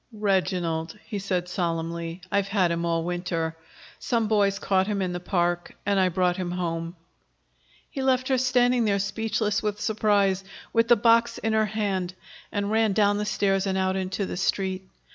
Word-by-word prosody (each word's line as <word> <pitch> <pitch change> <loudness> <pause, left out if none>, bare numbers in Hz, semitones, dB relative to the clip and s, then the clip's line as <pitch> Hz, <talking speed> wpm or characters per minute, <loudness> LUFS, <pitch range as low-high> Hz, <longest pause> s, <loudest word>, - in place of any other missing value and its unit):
"Reginald," 185 -5 -1
he 205 - -4
said 185 -2 -2
solemnly. 170 -1 -3
"I've 200 -1 +1
had 190 -3 +2
him 170 0 -1
all 165 -1 0
winter. 170 -2 -2 0.4
Some 230 -2 0
boys 200 -2 +2
caught 190 -1 +1
him 205 -2 -1
in 185 -2 -1
the 175 - -3
park, 175 -1 -1
and 200 -1 +2
I 185 -1 +3
brought 180 0 +1
him 180 -2 -3
home." 170 -1 -3 0.9
He 270 - -5
left 260 -1 +2
her 260 -1 +3
standing 245 -1 +3
there 200 -2 +2
speechless 210 +1 -1
with 210 -1 -2
surprise, 205 -3 +2 0.3
with 230 0 +3
the 240 - +7
box 230 +1 +3
in 220 +1 -1
her 220 0 +3
hand, 195 -4 -2 0.4
and 205 0 -2
ran 220 -2 +2
down 205 0 +3
the 210 - -1
stairs 195 -1 +1
and 190 0 0
out 190 0 +1
into 190 +1 -2
the 175 - -5
Street. 190 0 -1
195 Hz, 180 wpm, -26 LUFS, 180-215 Hz, 0.9 s, the